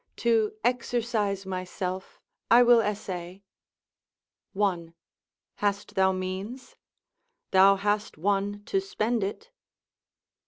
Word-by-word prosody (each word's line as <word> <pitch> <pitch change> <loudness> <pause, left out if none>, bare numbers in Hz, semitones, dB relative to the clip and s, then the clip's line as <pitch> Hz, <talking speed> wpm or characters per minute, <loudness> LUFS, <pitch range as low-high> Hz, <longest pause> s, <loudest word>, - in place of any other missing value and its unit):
To 225 -3 +2
exercise 230 -5 0
myself 185 0 -5 0.3
I 240 +1 +7
will 240 -1 +6
essay: 195 -3 -5 1.1
1. 180 -5 -1 0.6
Hast 205 0 -1
thou 190 0 +3
means? 190 +7 -5 0.8
thou 195 +1 +6
hast 205 0 -1
one 200 +3 -1
to 385 - 0
spend 240 - -1
it. 440 - -5
205 Hz, 90 wpm, -27 LUFS, 190-230 Hz, 1.1 s, I